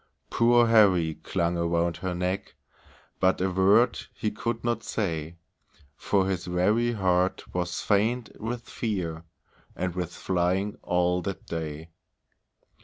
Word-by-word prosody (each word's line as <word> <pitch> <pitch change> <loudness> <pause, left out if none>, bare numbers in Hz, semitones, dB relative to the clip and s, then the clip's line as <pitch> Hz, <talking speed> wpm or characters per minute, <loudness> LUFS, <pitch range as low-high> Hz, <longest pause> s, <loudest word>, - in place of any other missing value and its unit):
Poor 120 0 +5
Harry 95 -8 +4
clung 85 -1 -1
around 85 0 0
her 95 -2 -3
neck, 90 +2 -3 0.6
But 95 0 +3
a 95 +1 0
word 100 +6 +4 0.2
he 105 - -2
could 115 +2 -3
not 120 0 0
say, 85 -5 -3 0.6
For 95 +3 +1
his 95 -2 -2
very 105 +7 +2
heart 95 -3 0
was 90 0 -2
faint 110 +4 +1
with 120 +2 -4
fear, 85 -8 -3 0.5
And 90 -1 -2
with 90 -1 -3
flying 95 +3 -1
all 90 0 +1
that 95 +1 -5
day. 80 0 -5
95 Hz, 125 wpm, -27 LUFS, 85-105 Hz, 0.6 s, Poor